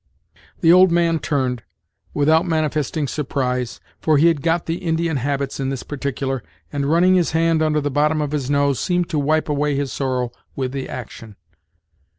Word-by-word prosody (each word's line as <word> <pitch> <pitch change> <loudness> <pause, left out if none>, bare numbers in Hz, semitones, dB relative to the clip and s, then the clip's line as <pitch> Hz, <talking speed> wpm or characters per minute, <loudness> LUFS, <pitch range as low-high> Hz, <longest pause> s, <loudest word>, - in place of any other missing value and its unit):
The 165 0 +6
old 185 0 +6
man 170 -1 +2
turned, 125 -2 -1 0.5
without 160 +4 +2
manifesting 155 -2 -1
surprise, 125 -4 -2 0.2
for 155 -2 +2
he 165 +4 +5
had 160 -4 0
got 165 +2 0
the 165 +1 -2
Indian 165 -3 -1
habits 140 +1 -2
in 135 -1 -1
this 135 -2 -4
particular, 135 -2 -3 0.3
and, 140 -1 -1
running 175 +4 +4
his 180 -4 +2
hand 165 0 +2
under 155 -1 +1
the 145 0 -2
bottom 150 +2 +2
of 150 -1 -2
his 145 -3 -2
nose, 140 -2 +2
seemed 175 -2 0
to 155 - 0
wipe 155 +2 +1
away 150 -1 0
his 140 -1 -2
sorrow 130 -3 -1 0.2
with 130 -2 -2
the 135 -1 -5
action. 115 -3 -8
145 Hz, 175 wpm, -21 LUFS, 135-160 Hz, 0.5 s, The